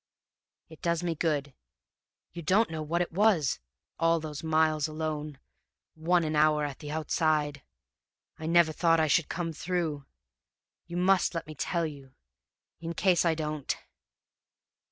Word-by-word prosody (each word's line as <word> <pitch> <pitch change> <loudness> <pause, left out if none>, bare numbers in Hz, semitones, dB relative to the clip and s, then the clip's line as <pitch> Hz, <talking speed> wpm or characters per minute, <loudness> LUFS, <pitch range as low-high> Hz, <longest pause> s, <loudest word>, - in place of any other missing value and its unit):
"'It 160 - -14
does 170 0 0
me 170 -1 0
good. 145 -4 -1 0.8
You 170 - -6
don't 190 +5 +2
know 160 -1 -3
what 170 +3 0
it - - -8
was, 180 - +2 0.4
all 165 0 +3
those 155 -1 -6
miles 155 -1 +2
alone, 155 -2 -4 0.6
one 170 +2 +2
an 155 -1 -1
hour 150 0 +3
at 140 -2 -6
the 150 - -8
outside! 150 -1 0 0.8
I 160 - -5
never 170 -1 +5
thought 165 +1 +3
I 160 - +4
should 155 +1 +2
come 165 -1 -3
through. 160 -4 -2 0.8
You 175 0 -5
must 185 0 +3
let 165 - -3
me 155 - -9
tell 170 +3 -1
you 140 -4 -9 0.6
in 165 +1 -5
case 180 -1 +3
I 165 -1 +3
don't!' 155 -3 -3
160 Hz, 150 wpm, -29 LUFS, 150-170 Hz, 0.8 s, never